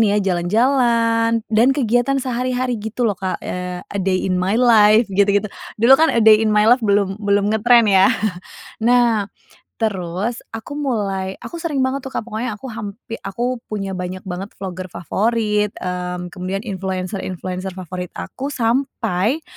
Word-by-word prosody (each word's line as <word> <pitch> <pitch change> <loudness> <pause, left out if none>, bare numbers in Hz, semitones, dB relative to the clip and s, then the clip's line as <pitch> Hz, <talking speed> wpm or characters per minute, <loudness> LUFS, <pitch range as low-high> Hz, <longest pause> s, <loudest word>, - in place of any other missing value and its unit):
ini 210 -2 +3
ya, - - +3
jalan-jalan 230 +3 +2
dan 230 +4 +5
kegiatan 245 +2 +1
sehari-hari 250 -1 -1
gitu 220 +3 -3
loh 205 -4 0
Kak. 190 -1 -2
Eee, 180 0 -5
a 200 - -6
day 185 0 0
in 185 -1 0
my 195 +4 +1
life 225 -2 +6
gitu 200 +1 +3
gitu. 205 +1 +2 0.3
Dulu 235 +5 +5
kan 320 - +4
a 230 - +2
day 215 -1 +7
in 220 - +2
my 210 0 +3
life 245 +4 +5
belum 200 -1 +1
belum 205 0 +1
ngetren 235 +2 +5
ya. 190 0 +6 0.7
Nah, 235 -3 +3 0.5
terus 200 +1 -2 0.2
aku 225 +6 -7
mulai 195 -8 -2
aku 340 - -7
sering 305 -6 -1
banget 265 +1 -2
tuh 265 - -7
Kak, - - -1
pokoknya 225 0 -3
aku 260 +4 -8
hampi 225 +1 -7
aku 245 +5 -2
punya 200 -2 -4
banyak 185 +1 -5
banget 190 +3 -5
vlogger 185 -1 -5
favorit, 210 +4 0
mmm, 180 -1 -4
kemudian 190 +1 -4
influencer-influencer 185 -1 -4
favorit 180 0 -6
aku, 275 +2 -5
sampai 235 - 0
210 Hz, 160 wpm, -19 LUFS, 190-235 Hz, 0.7 s, day